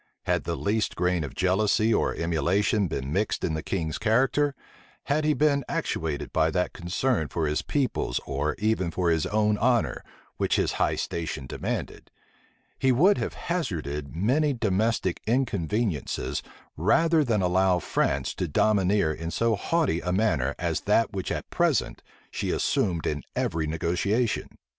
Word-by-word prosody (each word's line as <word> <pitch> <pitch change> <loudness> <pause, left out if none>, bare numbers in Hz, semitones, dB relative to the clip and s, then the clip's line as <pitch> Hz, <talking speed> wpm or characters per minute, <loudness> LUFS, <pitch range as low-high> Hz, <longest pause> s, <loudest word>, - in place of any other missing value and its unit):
Had - - 0
the - - -1
least 105 +1 0
grain 90 -1 +1
of 75 - -7
jealousy 105 +4 +2
or - - +1
emulation 90 +5 +1
been 70 -2 -4
mixed 105 +3 0
in 80 - 0
the 80 - -2
king's 80 -3 -3
character; 135 +6 +2 0.5
had 150 +2 0
he 150 -1 +3
been 145 -2 +2
actuated 80 -3 -2
by 80 - +3
that 90 +2 -1
concern 85 - -1
for 80 0 -2
his 75 0 0
people's 130 - -1
or 70 +2 -1
even 105 -3 0
for 85 0 0
his 80 -2 +1
own 105 0 +1
honor, 120 0 +1 0.3
which - - +1
his - - +1
high - - +1
station 80 -5 -4
demanded; - - -4 0.7
he 130 - +3
would 180 +11 +4
have - - -3
hazarded 80 - -3
many 135 - +2
domestic 110 -4 0
inconveniencies 105 - -1 0.3
rather 160 - +3
than 110 -7 +1
allow 90 0 +3
France - - 0
to 90 - -3
domineer 95 0 +2
in 80 +2 -5
so 115 +5 +1
haughty 155 - 0
a 90 - -2
manner 80 - +1
as 85 -2 -1
that 110 +2 +2
which 95 -2 -3
at - - -3
present - - +1 0.3
she - - -3
assumed 85 -4 0
in 75 -1 -1
every 80 -1 -1
negotiation. 95 +9 0
95 Hz, 155 wpm, -26 LUFS, 80-115 Hz, 0.7 s, would